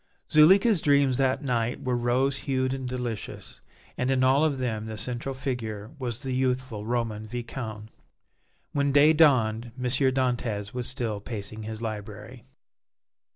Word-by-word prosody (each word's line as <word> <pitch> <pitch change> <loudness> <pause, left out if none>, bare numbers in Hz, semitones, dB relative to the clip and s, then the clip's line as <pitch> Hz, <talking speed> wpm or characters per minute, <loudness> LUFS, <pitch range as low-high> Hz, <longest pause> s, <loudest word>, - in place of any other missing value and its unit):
Zuleika's 190 +5 +6
dreams 140 -3 +3
that 135 +2 +1
night 120 -3 -1
were 125 -1 0
rose 125 +3 +1
hued 130 -2 -1
and 130 -2 -4
delicious, 125 -4 -5 0.4
and 125 - 0
in 130 -1 +2
all 135 +3 +4
of 150 -3 +1
them 110 -4 -2
the 110 -1 -6
central 125 +4 -3
figure 115 -5 -4
was 125 0 -4
the 130 -1 -3
youthful 125 -4 -1
Roman 115 -3 -2
Viscount. 110 -2 -6 0.8
When 140 -1 +1
day 145 +3 +6
dawned 120 -7 +3
M. 125 - -6
Dantès 125 -5 0
was 125 -1 -1
still 115 -5 -2
pacing 110 0 -6
his 110 +1 -6
library. 110 +2 -7
125 Hz, 145 wpm, -27 LUFS, 110-135 Hz, 0.8 s, Zuleika's